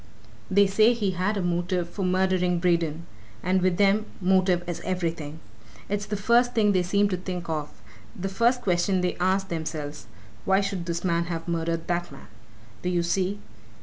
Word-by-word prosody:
They 200 +1 +5
say 215 +4 +4
he'd 205 -5 -1 0.2
a 195 - -1
motive 175 0 0
for 190 +3 -5
murdering 185 -1 +2
Braden 170 -2 0 0.4
and 185 +1 +2
with 180 -1 +2
them 205 +2 +3
motive 185 -1 +2
is 175 - -4
everything. 165 -4 -3 0.5
It's 205 0 -2
the 210 - -2
first 240 +4 +3
thing 210 -2 +4
they 185 -2 +3
seem 200 +3 +2
to 185 - -1
think 180 -1 -5
of; 155 -2 -2 0.5
they 195 - -2
first 235 +6 +2
question 180 0 +1
they 180 0 0
ask 190 +2 +1
themselves. 155 -3 -5 0.4
'Why 190 0 +3
should 195 -3 -3
this 170 0 -2
man 170 -2 +1
have 165 -1 -5
murdered 165 -1 -1
that 175 -1 -2
man?' 135 - -13 0.5
do 180 - -1
you 175 -1 +1
see! 190 +3 -1
180 Hz, 175 wpm, -26 LUFS, 170-195 Hz, 0.5 s, They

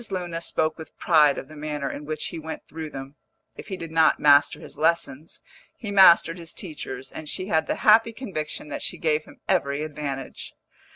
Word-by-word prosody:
Luna 175 -3 -4
spoke 160 -1 -1
with 160 - -11
pride 150 -4 +4
of - - -6
the 155 - -13
manner 150 -2 -4
in 150 - -8
which 155 0 -2
he 165 - -6
went 160 0 -8
through 160 0 -7
them; 135 0 -9 0.4
if - - -10
he 190 -3 -5
did 165 -2 -7
not 160 -1 +4
master 145 -1 +5
his - - -11
lessons, 160 -2 -1 0.3
he 215 -4 -6
mastered 175 -3 +6
his 165 -1 -7
teachers, 135 -7 -7
and 155 -1 -7
she 185 +2 -3
had 160 -4 +1
the - - 0
happy 225 +2 +6
conviction 155 - -5
that - - -5
she - - -3
gave 155 -1 0
him - - -17
every 145 -6 0
advantage. 145 -3 -6
155 Hz, 195 wpm, -24 LUFS, 150-170 Hz, 0.4 s, mastered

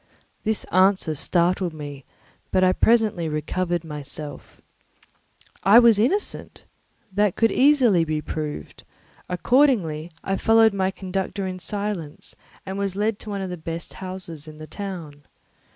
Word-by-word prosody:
This 220 -1 0
answer 185 -3 +3
startled 175 +3 0
me, 145 -3 -8 0.4
but 185 - +2
I 185 0 +5
presently 215 -8 +2
recovered 175 +3 -2
myself. 150 -1 -8 1.0
I 200 +5 +7
was 235 -3 +7
innocent; 335 - -1 0.5
that 205 -1 +1
could 225 -1 +3
easily 255 - +4
be 155 -1 -1
proved; 150 - -6 0.5
accordingly 180 - +2
I 195 0 -1
followed 225 -1 +5
my 190 -1 +1
conductor 190 +1 -4
in 185 0 -4
silence 200 -6 -5 0.3
and 190 +1 -4
was 195 -2 -2
led 210 +1 0
to 215 - -9
one 200 -1 -3
of 190 -1 -4
the 180 - -5
best 165 +1 -6
houses 185 -5 -7
in 155 0 -11
the 155 - -8
town. 170 -6 -7
185 Hz, 135 wpm, -23 LUFS, 160-205 Hz, 1.0 s, I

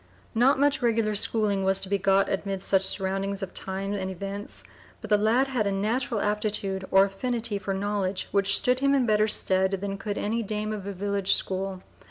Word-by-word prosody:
Not 255 +4 +3
much 285 -1 +2
regular 225 -3 +1
schooling 205 -1 +1
was 190 0 +3
to - - -1
be 200 +1 0
got 195 +1 +3
amid 195 -1 -3
such 195 -1 +2
surroundings 195 +1 -2
of 185 - -6
times 195 +1 -3
and 190 0 -3
events, 195 +2 -6 0.4
but 220 - -10
the 210 - +6
lad 225 +5 +3
had 240 -6 0
a - - 0
natural 220 +4 -1
aptitude 205 -2 -1
or 195 +1 +6
affinity 220 +1 -2
for 200 - -4
knowledge 200 -1 -2
which 200 0 +3
stood 250 0 +2
him 275 +1 +3
in 265 -3 +2
better 215 -1 +3
stead 190 -2 +1
than 195 +1 -3
could 205 0 -4
any 225 +3 -1
dame 215 0 -3
of 200 -2 -6
a - - -3
village 200 0 0
school. 190 0 -3
200 Hz, 200 wpm, -26 LUFS, 195-215 Hz, 0.4 s, the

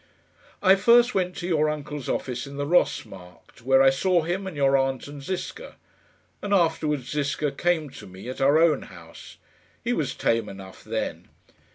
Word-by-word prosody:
"I 190 0 +6
first 240 +5 +5
went 180 -1 -1
to 175 - -5
your 155 -3 +2
uncle's 150 -2 -5
office 125 0 -3
in 140 0 -9
the 145 - -2
Ross 175 +4 +2
Markt, 90 +2 -15
where 135 +2 +4
I 135 - +6
saw 175 +5 +1
him 185 +4 -3
and 175 -6 -7
your 135 -1 +3
aunt 135 -1 0
and 145 0 -9
Ziska. 190 - -6 0.7
And 205 0 +1
afterwards 155 -7 0
Ziska 145 0 -1
came 160 0 0
to - - -11
me, 95 +4 -11
at 130 - -6
our 140 +3 +5
own 160 -3 +3
house. 85 -3 -13 0.5
He - - 0
was - - -2
tame 115 -2 0
enough 95 -1 -11
then." - - -4
145 Hz, 180 wpm, -25 LUFS, 130-175 Hz, 0.7 s, I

